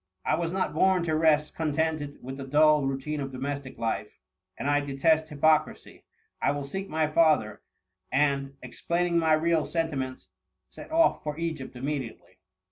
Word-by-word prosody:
I - - +1
was 165 +1 -1
not 190 0 -1
born 190 -2 +3
to 160 -2 0
rest 155 -1 +2
con 155 -2 -1
tented 155 -2 -1
with 130 +2 -6
the 135 - -6
dull 150 0 +4
routine 135 +3 -3
of 135 -1 -4
domestic 140 +1 -5
life, 115 -1 -3 0.4
and - - -3
I 145 0 +3
detest 155 +3 +1
hypocrisy: 155 +1 0 0.4
I - - +2
will 145 0 -4
seek 190 +8 -5
my 155 0 +1
father; 150 -9 +2 0.5
and, 140 0 +1
explaining 170 +6 -1
my 160 -1 +3
real 160 0 +2
sentiments;^ 140 -6 -3 0.4
set - - -12
off 330 +1 +3
for 150 -1 -5
Egypt 160 -6 -4
immediately." 130 -8 -5
150 Hz, 160 wpm, -27 LUFS, 135-160 Hz, 0.5 s, dull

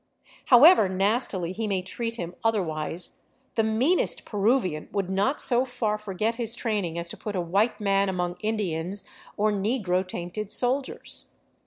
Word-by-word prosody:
However 260 - +7
nastily 195 -2 0
he 220 +3 -3
may 190 -3 -1
treat 230 +5 -4
him 175 -6 -5
otherwise, 175 -6 -1 0.3
the 225 - +2
meanest 240 +11 +1
Peruvian 205 - 0
would 195 -2 -2
not 200 +9 +1
so 245 0 +2
far 245 -5 -2
forget 215 +3 -2
his 230 -1 -1
training 205 -8 -2
as 170 0 -3
to - - -7
put 210 -2 -5
a - - 0
white 200 +6 +1
man 195 -1 +2
among 180 -1 -2
Indians 195 -3 -2 0.3
or 215 +1 +2
negro 200 -3 0
tainted 185 +4 -5
soldiers. 260 +4 0
205 Hz, 150 wpm, -26 LUFS, 185-230 Hz, 0.3 s, However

